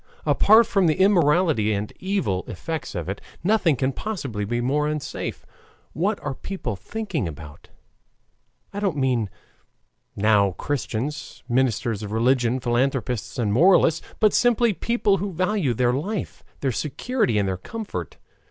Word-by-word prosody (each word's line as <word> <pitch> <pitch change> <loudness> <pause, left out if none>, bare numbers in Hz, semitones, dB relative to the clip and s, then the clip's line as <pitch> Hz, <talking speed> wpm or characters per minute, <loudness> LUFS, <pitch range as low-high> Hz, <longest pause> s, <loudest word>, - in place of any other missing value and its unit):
Apart 220 +3 +6
from 195 -5 +2
the 155 - +3
immorality 165 - +3
and 105 +1 -3
evil 185 - -1
effects 160 - -5
of 85 -2 -4
it, 95 +2 -4 0.2
nothing 190 -5 +3
can 130 +1 0
possibly 135 - -4
be 120 +3 -1
more 145 +5 +1
unsafe. 150 -1 -4 0.5
What 200 +7 0
are 135 - -3
people 130 - -5
thinking 190 - -4
about? 75 -1 -10 1.0
I 200 - -3
don't 195 -7 -1
mean 125 -6 +1 0.9
now 100 -2 +3
Christians, 140 +4 -4
ministers 120 -3 0
of 105 -1 -6
religion, 120 +2 +2
philanthropists, 125 -1 -1
and 110 -4 0
moralists, 165 - +4 0.2
but 215 -1 +4
simply 240 -2 +3
people 205 +2 +1
who 200 +1 -3
value 185 - 0
their 125 +1 +2
life, 190 - -4 0.2
their 135 - +1
security, 150 - -1
and 100 -1 +1
their 95 - -1
comfort. 220 - -6
135 Hz, 140 wpm, -24 LUFS, -, 1.0 s, Apart